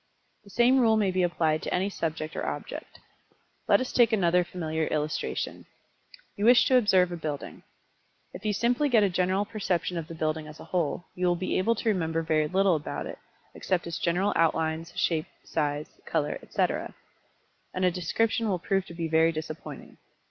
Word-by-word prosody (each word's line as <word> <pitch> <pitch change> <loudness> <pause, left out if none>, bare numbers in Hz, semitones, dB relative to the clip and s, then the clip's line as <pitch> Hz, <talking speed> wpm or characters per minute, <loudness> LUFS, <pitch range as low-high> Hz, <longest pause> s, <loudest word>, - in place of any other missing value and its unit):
The 200 - -16
same 245 +5 +4
rule 225 -3 +4
may 200 -3 +2
be 185 0 +1
applied 160 -3 +1
to - - -4
any 185 +2 +1
subject 160 -5 -4
or - - -3
object. - - -6 0.7
Let - - +5
us 255 - -3
take 240 -2 +5
another 180 -4 +3
familiar 160 -3 -3
illustration. 150 0 -3 0.7
You 205 - -1
wish 245 +1 +7
to 260 - +3
observe 190 -6 +4
a - - -3
building. 150 -3 -5 0.7
If - - -9
you 215 - +1
simply 245 +7 +1
get 225 -5 +5
a 200 - +3
general 185 +3 +1
perception 180 -6 -2
of 160 - -7
the 165 - -8
building 155 -1 -2
as 155 0 -11
a - - -9
whole, 175 0 -1
you 180 0 0
will 175 - +3
be 185 +2 -2
able 230 +5 +2
to 225 - -1
remember 165 -5 0
very 155 -1 +1
little 190 +1 +3
about 150 - -4
it, - - -7 0.3
except 180 -2 -1
its 170 0 -4
general 180 +4 +1
outlines, 160 0 +1
shape, 160 -2 +1 0.2
size, 150 -1 -3
color, - - -1
etc. - - -2 0.8
And 185 0 0
a 180 - +4
description 220 +6 0
will 185 - +1
prove 190 +2 -1
to 170 - -10
be 165 -1 -2
very 160 +1 +4
disappointing. 155 0 -7
175 Hz, 185 wpm, -27 LUFS, 160-200 Hz, 0.8 s, wish